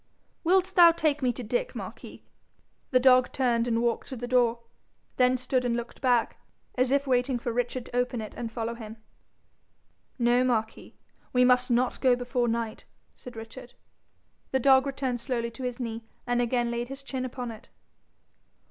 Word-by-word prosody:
'Will 370 +3 +5
thou 360 -2 +6
take 305 -3 0
me 255 -1 +2
to 245 - -6
Dick, - - -2
Marquis?' - - -9 0.7
The 255 - +4
dog 255 -1 +5
turned 240 -3 +1
and 230 0 +1
walked 235 -1 -1
to 265 - -6
the 245 0 -5
door, 240 -2 +2 0.6
then 255 0 +4
stood 255 0 -1
and 240 -1 0
looked 235 0 -7
back, 245 -3 +2 0.4
as 255 0 +1
if 280 0 +2
waiting 250 -1 +1
for 235 0 -4
Richard 245 +1 -2
to - - -10
open 245 -1 0
it 215 -1 -7
and 230 -2 -5
follow 230 0 -3
him. 225 -1 -9 1.2
'No, 240 0 +3
Marquis, 220 -3 -2 0.4
we 250 0 +5
must 250 0 +3
not 245 +1 +1
go 255 -2 +5
before 245 0 -1
night,' 230 -1 -3 0.3
said 250 -1 -12
Richard. 225 +2 -10 0.7
The 265 - +1
dog 265 +1 +5
returned 260 -3 -2
slowly 235 -2 -2
to 230 - -11
his 250 0 -4
knee, 230 -2 -4 0.2
and 245 0 +1
again 240 0 0
laid 235 0 -3
his 270 +1 -8
chin 265 -1 -4
upon 250 -1 -5
it. 220 - -13
245 Hz, 175 wpm, -27 LUFS, 235-260 Hz, 1.2 s, thou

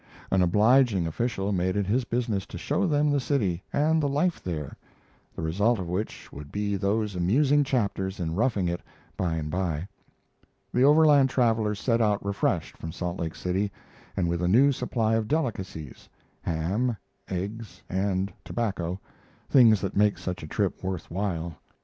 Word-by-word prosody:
An 95 - +3
obliging 105 +2 +4
official 100 +3 -1
made 95 -1 0
it 100 -1 +1
his 120 +6 +1
business 115 -5 -1
to - - -8
show 200 - 0
them 150 -2 +2
the 145 - +2
city 105 - 0
and 160 +2 +2
the 145 - +1
life 160 +5 0
there, 75 -6 -4 0.6
the - - -5
result 100 +9 +2
of 90 -3 -4
which 95 +5 -4
would 70 +1 -9
be 105 0 -1
those 105 +1 0
amusing 135 +12 +3
chapters 100 -7 -1
in 80 -2 -2
'Roughing 105 -2 +1
It' 85 0 -2 0.3
by 85 -3 -1
and 75 -1 -3
by. 85 -1 -2 0.9
The 125 - +3
Overland 145 -2 +6
travelers 110 -5 +1
set 115 0 +1
out 105 -2 +1
refreshed 100 0 -1
from 80 - -6
Salt 90 +1 -4
Lake 80 -1 -3
City, 95 +3 -1 0.5
and 90 -3 +1
with 85 0 -1
a 90 - +1
new 130 +10 +5
supply 120 -4 0
of 110 -1 +1
delicacies 95 - -3 0.3
ham, 100 +9 -1 0.3
eggs, 100 +4 -5
and 95 0 -1
tobacco 95 -6 -2 0.5
things 115 -6 +6
that 95 -1 -3
make 105 0 +3
such 90 -1 -4
a 75 - -7
trip 100 +4 -1
worth 95 -3 -4
while. 85 -3 -2
100 Hz, 165 wpm, -27 LUFS, 90-120 Hz, 0.9 s, Overland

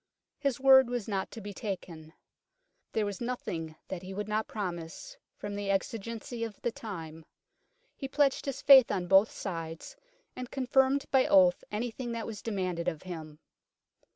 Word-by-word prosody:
His 275 -3 0
word 265 -2 +7
was 245 -4 -3
not 195 -3 -2
to - - -9
be 205 0 -7
taken. 175 -6 -6 0.4
" - - -49
There 220 - +1
was 205 +1 -5
nothing 170 -10 -4
that 185 -2 -5
he 190 +1 -8
would 210 +1 -3
not 215 +1 -1
promise 185 - -5 0.2
from 205 0 -5
the 200 0 -3
exigency 230 +4 -2
of 225 -3 -6
the 240 - +1
time. 165 -8 -7 0.7
He 270 - -5
pledged 280 0 +1
his 275 +1 -4
faith 265 -3 +9
on 185 -3 -1
both 195 +4 +6
sides, 165 - -6 0.4
and 250 -1 -6
confirmed 265 +1 +2
by 265 0 +4
oath 280 -3 +5
anything 235 +3 -3
that 230 -1 -3
was 220 -2 -6
demanded 185 -6 -2
of 160 -4 -2
him." 160 -4 -7
210 Hz, 165 wpm, -30 LUFS, 185-255 Hz, 0.7 s, faith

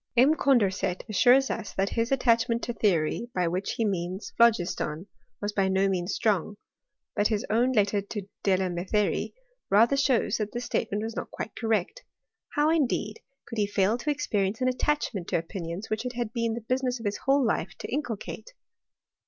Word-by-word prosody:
M. 265 +6 +6
Condorcet 205 - +1
assures 250 +6 +4
us 215 -2 -5
that 195 +1 0
his 230 +2 -1
attachment 235 -2 +2
to 240 - -2
theory, 200 +2 +1
by 180 -2 +1
which 180 +3 -2
he 230 - 0
means 185 0 -3
phlogiston, 180 -7 +2 0.3
was 205 0 -3
by 195 -2 +2
no 190 +1 +2
means 180 -1 -1
strong 205 -1 0 0.3
;* - - -61
but 205 - +3
his 215 -2 -1
own 240 +4 +3
letter 205 -3 +2
to 200 +1 -6 0.2
Delametherie 190 +1 0 0.3
rather 230 +7 +5
shows 275 -4 +2
that 210 -1 -3
this 240 +1 -3
state 225 - -1
ment 205 +2 -1
was 225 0 -4
not - - -4
quite 220 - -6
correct. 225 - -1 0.5
How, 300 +1 +3
indeed, 245 -9 0 0.3
could 230 - -5
he 205 - +2
&0 205 +2 +2
to 300 - -3
experience 215 -8 0
an 255 - +1
attachment 250 - -1
to - - +1
opinions 170 +3 -5
which 215 +1 -1
it 250 -1 -4
had 235 -2 -3
been 230 -2 0
the 235 - -5
business 255 +2 -1
of 230 - -9
his 205 0 -1
whole 270 0 +2
life 195 -4 -1
to - - -6
inculcate 280 - -4
215 Hz, 185 wpm, -27 LUFS, 195-245 Hz, 0.5 s, M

